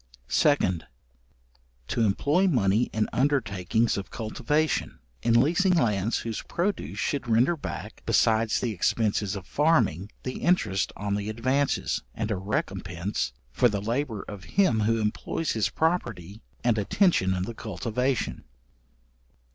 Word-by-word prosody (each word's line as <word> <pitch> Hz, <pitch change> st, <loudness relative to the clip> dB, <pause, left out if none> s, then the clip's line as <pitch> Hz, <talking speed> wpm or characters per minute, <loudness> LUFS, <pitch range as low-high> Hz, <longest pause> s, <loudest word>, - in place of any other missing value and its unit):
2d. 95 Hz, -, +3 dB, 1.1 s
To 120 Hz, -, 0 dB
employ 145 Hz, -, +2 dB
money 115 Hz, -, +2 dB
in 110 Hz, -1 st, 0 dB
undertakings 115 Hz, -6 st, +1 dB
of 100 Hz, 0 st, -5 dB
cultivation; 150 Hz, +7 st, -1 dB, 0.2 s
in 115 Hz, 0 st, +4 dB
leasing 180 Hz, +8 st, +3 dB
lands 110 Hz, -, +1 dB
whose 115 Hz, -2 st, -4 dB
produce 185 Hz, +2 st, -2 dB
should 140 Hz, -3 st, -1 dB
render 120 Hz, +9 st, +4 dB
back, 150 Hz, -, -7 dB
besides 110 Hz, 0 st, +2 dB
the 120 Hz, -, -1 dB
expences 105 Hz, +1 st, 0 dB
of 95 Hz, -2 st, -7 dB
farming, 115 Hz, -, +2 dB
the 130 Hz, -, -4 dB
interest 110 Hz, -, +1 dB
on 100 Hz, 0 st, -2 dB
the 100 Hz, +1 st, -2 dB
advances, 130 Hz, +6 st, 0 dB
and 110 Hz, 0 st, -2 dB
a -, -, +1 dB
recompense 95 Hz, -, -2 dB, 0.2 s
for 120 Hz, -, +3 dB
the 105 Hz, -2 st, -2 dB
labour 115 Hz, +1 st, -2 dB
of 100 Hz, -3 st, -8 dB
him 185 Hz, -, +4 dB
who 115 Hz, +1 st, +2 dB
employs 110 Hz, +9 st, -2 dB
his 110 Hz, -4 st, +1 dB
property 115 Hz, -, -2 dB, 0.2 s
and 120 Hz, -3 st, +2 dB
attention 100 Hz, -, +2 dB
in 90 Hz, -, -1 dB
the 115 Hz, -, -5 dB
cultivation. 115 Hz, +5 st, -2 dB
115 Hz, 130 wpm, -27 LUFS, 100-140 Hz, 1.1 s, in